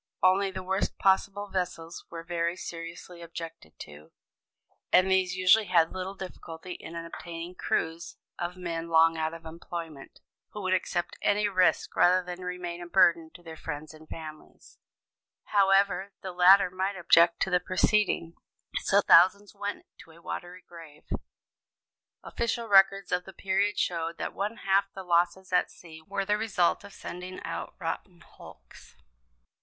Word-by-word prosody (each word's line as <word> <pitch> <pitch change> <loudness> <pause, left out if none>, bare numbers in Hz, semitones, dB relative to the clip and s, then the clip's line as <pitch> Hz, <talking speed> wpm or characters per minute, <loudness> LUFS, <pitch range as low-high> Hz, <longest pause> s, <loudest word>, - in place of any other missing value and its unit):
Only 190 +2 +4
the 190 -1 -6
worst 190 +1 -1
possible 200 +1 +1
vessels 175 -3 -4
were 165 -1 -7
very 170 0 -1
seriously 170 +1 -8
objected 165 - -9
to; 75 +1 -12 0.8
and 190 +1 +5
these 185 -1 +2
usually 185 +3 +4
had 170 -3 +3
little 185 +1 -5
difficulty 180 -2 -9
in 170 - -10
obtaining 170 +1 -7
crews 165 -2 -2 0.2
of 175 +1 -4
men 170 -2 -4
long 165 0 +5
out 160 0 -2
of 165 0 -12
employment, 165 -2 -8 0.3
who 210 - -6
would 185 0 +1
accept 175 -1 -2
any 205 0 +2
risk 185 -3 +2
rather 180 +1 +4
than 180 +1 -7
remain 180 -1 -5
a 175 - -7
burden 170 -3 +4
to 175 - -14
their 165 -1 -9
friends 155 0 -7
and 155 0 -16
families, 155 -1 -11 0.6
however 195 0 +2
the 190 - -4
latter 180 +1 +6
might 190 +2 -2
object 170 -1 +5
to 190 - 0
the 180 - +4
proceeding. 185 -1 +1 0.4
So 200 +1 +3
thousands 195 +3 +5
went 205 0 -5
to - - -15
a 165 +1 -16
watery 175 +1 -7
grave. 165 -3 -13 1.2
Official 235 0 -2
records 195 -1 +5
of 180 0 0
the 190 - -11
period 195 +2 0
showed 165 -1 -1
that - - -4
one 210 +4 -3
half 195 +1 +3
the 190 - -7
losses 175 +1 +1
at 180 - +3
sea 160 -2 -13
were 195 0 -2
the 210 +1 +1
result 195 -5 +1
of 200 - -11
sending 180 0 -8
out - - -5
rotten 175 -3 -5
hulks. - - -16
180 Hz, 155 wpm, -28 LUFS, 165-195 Hz, 1.2 s, latter